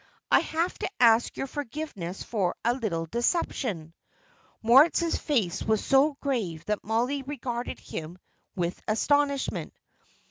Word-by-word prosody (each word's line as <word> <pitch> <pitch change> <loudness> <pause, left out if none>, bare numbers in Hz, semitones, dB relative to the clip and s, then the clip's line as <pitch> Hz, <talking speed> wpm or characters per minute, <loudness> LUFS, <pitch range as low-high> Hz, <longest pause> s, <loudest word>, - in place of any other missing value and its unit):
I - - +7
have 335 +3 -1
to - - -2
ask 230 -1 +4
your - - -2
forgiveness 265 - -5
for 195 -6 -1
a 235 - +4
little 200 -10 -2
deception." 230 - -1 0.7
Moritz's 295 +8 +5
face 225 - 0
was 220 -1 0
so 275 +2 +4
grave 195 - -2
that 210 -1 -2
Mollie 245 +6 0
regarded 250 -3 -4
him 165 +3 -7 0.4
with 175 -2 -2
astonishment. 280 +5 +1
235 Hz, 120 wpm, -27 LUFS, 195-280 Hz, 0.7 s, I